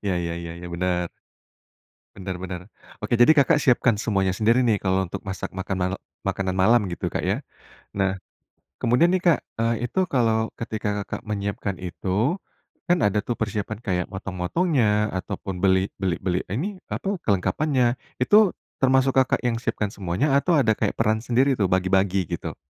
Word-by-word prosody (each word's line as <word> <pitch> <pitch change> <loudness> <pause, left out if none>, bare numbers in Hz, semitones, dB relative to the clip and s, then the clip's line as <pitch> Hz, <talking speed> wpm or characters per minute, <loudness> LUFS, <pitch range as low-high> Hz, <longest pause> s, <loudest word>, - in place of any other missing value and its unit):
Ya 95 - +1
ya 85 -1 -2
ya 85 -1 -6
ya, 90 0 -8
bener. 90 0 -1 1.1
Bener 95 -1 -5
bener. 90 -2 -5 0.4
Oke, - - -2
jadi 120 - +8
Kakak 150 +2 +4
siapkan 125 -3 +4
semuanya 95 -5 +1
sendiri 115 +6 +3
nih, 110 -4 +2
kalau 95 0 +1
untuk - - -6
masak 95 -1 -5
makan 95 0 -3
mal 90 +1 0 0.3
makanan 95 -1 -1
malam, 115 +5 +5
gitu, 85 - -4
Kak, - - -2
ya? - - 0 0.6
Nah, 95 -1 +2 0.7
kemudian 155 +10 +3
nih, 185 - +2
Kak, 170 -6 +4 0.2
eee, 115 +1 0
itu 185 +9 0
kalau 110 -3 +2
ketika 105 -2 -3
Kakak - - -6
menyiapkan 100 -1 -3
itu, 100 - -1 0.5
kan 175 +1 +4
ada 105 0 +2
tuh 120 - -2
persiapan 105 -1 -3
kayak 90 -3 0
motong-motongnya 105 - 0
ataupun 95 0 -5
beli 95 0 +3
beli 95 -4 0
beli 90 -1 +1
ini, 185 - -3
apa, 195 -2 -2
kelengkapannya, 120 - +1 0.3
itu 205 +7 +5 0.3
termasuk 130 0 +4
Kakak 130 - +3
yang 120 -2 +1
siapkan 105 -3 -2
semuanya 100 - -1
atau 165 +3 +2
ada 115 -6 +4
kayak - - 0
peran 110 -1 +1
sendiri 125 +4 +2
tuh, 100 -4 +2
bagi-bagi, 95 0 +2
gitu? - - -5
105 Hz, 165 wpm, -24 LUFS, 95-125 Hz, 1.1 s, jadi